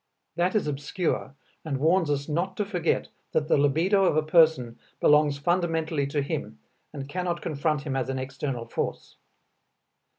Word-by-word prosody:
That 180 +3 +1
is 215 - +2
obscure 145 0 -2 0.3
and 145 -4 -2
warns 165 +3 +2
us 140 -1 -1
not 175 +5 -2
to 210 - 0
forget 180 -5 -1 0.2
that 150 -1 +1
the - - +4
libido 165 +8 +3
of 155 - +2
a 155 - +3
person 155 -8 +3 0.2
belongs 150 -1 +4
fundamentally 160 -2 0
to 145 0 -1
him 140 - -4 0.3
and 140 -2 -7
cannot 175 +2 -3
confront 150 -1 -1
him 135 -2 -3
as 130 -1 -1
an 135 - -2
external 130 -2 -4
force. 115 - -4
150 Hz, 160 wpm, -26 LUFS, 140-170 Hz, 0.3 s, the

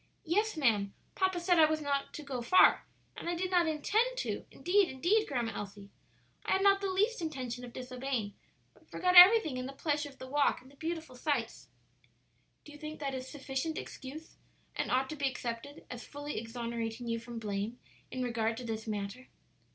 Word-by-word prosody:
"Yes, 415 +4 +1
ma'am; 210 -8 +2 0.2
papa 375 -2 +1
said 345 0 +3
I 315 - +9
was 315 0 0
not 280 -2 -1
to 305 - -6
go 265 -4 -4
far, 370 +11 +5 0.3
and - - -5
I 345 - 0
did 365 +2 -2
not 350 -2 +4
intend 435 +11 +1
to; - - -3
indeed, 385 +1 +2
indeed, 370 +12 +2
Grandma 240 -5 -1
Elsie, 200 0 -7 0.5
I - - +1
had 385 - +2
not 395 0 +5
the 395 - -1
least 415 +3 +1
intention 255 -6 -4
of 245 - -8
disobeying, 250 -4 -3 0.4
but - - -25
forgot 360 0 +1
everything 355 - +9
in 255 0 -3
the 275 - -7
pleasure 295 +1 -1
of 270 - -17
the - - -8
walk 285 +2 +2
and 260 +2 -17
the - - -19
beautiful 320 -2 -5
sights." 250 -3 -2 1.0
"Do 300 - -11
you 295 - -12
think 310 0 -7
that 275 -2 -3
is 260 0 -5
sufficient 285 +2 -3
excuse, 295 +5 -8 0.4
and - - -2
ought 260 +1 +2
to - - -4
be 280 -2 0
accepted 250 +3 -6
as 245 -1 -6
fully 290 -2 -5
exonerating 230 0 -4
you 230 0 -1
from 235 0 -8
blame 210 +1 -3 0.3
in 255 - -3
regard 225 -2 0
to 250 - -6
this 225 -1 -4
matter?" 210 +4 -4
275 Hz, 195 wpm, -32 LUFS, 235-325 Hz, 1.0 s, I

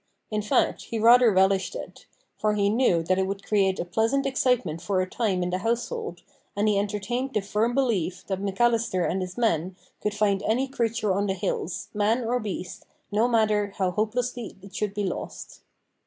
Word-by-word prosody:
In 210 0 0
fact, 210 - +1
he 230 - -4
rather 235 +1 +6
relished 190 - +2
it; - - -9 0.3
for 215 0 0
he 200 -1 +2
knew 215 -8 +3
that 185 +3 +1
it 190 - +1
would 195 0 -5
create 195 -3 +2
a - - -1
pleasant 225 +10 +1
excitement 250 - +1
for 185 +1 0
a 185 - 0
time 190 -4 0
in 180 - -2
the 185 - -1
household, 240 - -3 0.3
and 205 +1 +1
he 205 -2 +3
entertained 220 +6 -2
the - - +4
firm 210 +4 0
belief 195 -9 0
that 190 -1 -3
McAllister 200 -2 +1
and 190 - -1
his 180 +2 -6
men 185 -6 0 0.3
could 210 0 -1
find 205 -2 +2
any 240 +6 +1
creature 225 -6 0
on 200 +2 0
the 190 - 0
hills, 185 -1 -3
man 215 +4 +1
or 245 +2 +1
beast, 190 -5 -5 0.3
no 215 +3 +3
matter 215 -4 +2
how 185 -2 +1
hopelessly 235 +3 -2
it 195 -1 -12
should 210 -1 -2
be 205 - -1
lost. 185 - -5
210 Hz, 190 wpm, -26 LUFS, 190-235 Hz, 0.3 s, rather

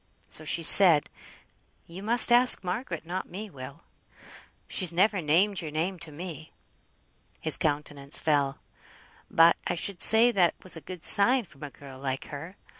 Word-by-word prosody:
So 155 - -5
she 170 +2 -5
said 165 -4 +6 0.7
"You 175 +3 -13
must 235 +4 +4
ask 245 -3 +5
Margaret, 180 -2 -7
not 180 +3 -8
me, 205 +3 -11
Will; 130 -3 -14 0.8
she's 185 -3 0
never 190 +3 -1
named 180 +6 -2
your 160 - -9
name 170 +5 -6
to 165 - -9
me." 160 0 -12 0.9
His 155 -2 +6
countenance 145 -2 -4
fell. 140 -3 -3 0.7
"But 165 +1 +2
I 175 - -4
should 175 +1 -5
say 230 +2 +5
that 180 -6 -1
was 185 - -5
a 165 - -12
good 180 +2 -13
sign 240 +5 +3
from 140 -6 -22
a 145 - -9
girl 135 -2 -16
like 135 -1 -7
her. 165 +6 -11
170 Hz, 160 wpm, -24 LUFS, 150-195 Hz, 0.9 s, said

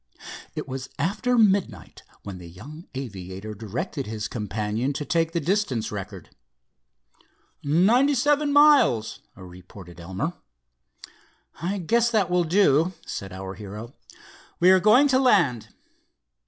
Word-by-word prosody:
It - - -5
was 130 0 -6
after 215 - 0
midnight 190 - +1 0.2
when 95 -2 -8
the 85 -1 -11
young 145 - -12
aviator 100 -4 -7
directed 120 - -5
his 110 0 -4
companion 110 +3 -3
to 150 +1 -5
take 165 0 0
the 170 - -1
distance 150 - -1
record. 100 -3 -8 1.3
"Ninety 220 - +3
seven 290 +3 +2
miles," 285 - +4 0.2
reported 90 -2 -13
Elmer. 95 - -4 1.3
"I 185 +4 -2
guess 230 +6 +1
that 210 -6 +1
will 180 -1 +2
do," 170 -1 +3
said 95 -1 -6
our 95 +1 -7
hero. 105 +4 -9 0.7
"We 180 +2 +6
are 190 - +6
going 215 +9 +5
to 260 -1 +3
land." 170 - +2
140 Hz, 125 wpm, -24 LUFS, -, 1.3 s, We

